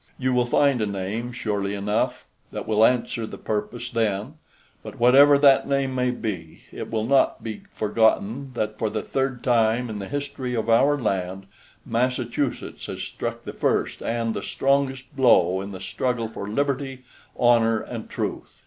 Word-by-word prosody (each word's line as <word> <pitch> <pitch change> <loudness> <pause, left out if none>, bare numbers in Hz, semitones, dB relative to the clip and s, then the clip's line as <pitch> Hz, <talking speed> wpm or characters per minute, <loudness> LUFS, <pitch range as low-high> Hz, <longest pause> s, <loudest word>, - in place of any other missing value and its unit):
You 130 -1 0
will 125 -1 +2
find 135 -1 +3
a 105 - +1
name, 100 +5 -3
surely 105 -4 -2
enough, 105 +2 -1 0.3
that - - -6
will 110 0 +3
answer 115 -2 +2
the - - -8
purpose 115 +3 -4
then; 110 +2 -1 0.5
but - - -9
whatever 140 +4 +7
that 140 -1 +5
name 140 -1 0
may 125 -1 +1
be, 105 -9 -5
it - - -6
will 110 -1 -1
not 135 +2 +2
be 110 -2 -5
forgotten 110 +4 +1
that, 110 -1 -2
for 110 - 0
the 105 0 -3
third 135 -2 -2
time 120 -1 +2
in 105 - -5
the 100 - -5
history 140 -3 -3
of 115 0 0
our 140 +6 +4
land, 95 -3 -2 0.4
Massachusetts 125 +2 -2
has - - -5
struck - - -5
the - - -7
first - - 0
and 115 -1 -1
the - - -4
strongest 135 -1 0
blow 95 -8 +4
in 100 +1 -6
the 95 - -7
struggle 115 +4 -2
for 105 -2 -7
liberty, 135 +1 -2 0.3
honor, 115 -2 +4
and - - -7
truth." - - -5
120 Hz, 165 wpm, -24 LUFS, 110-130 Hz, 0.5 s, whatever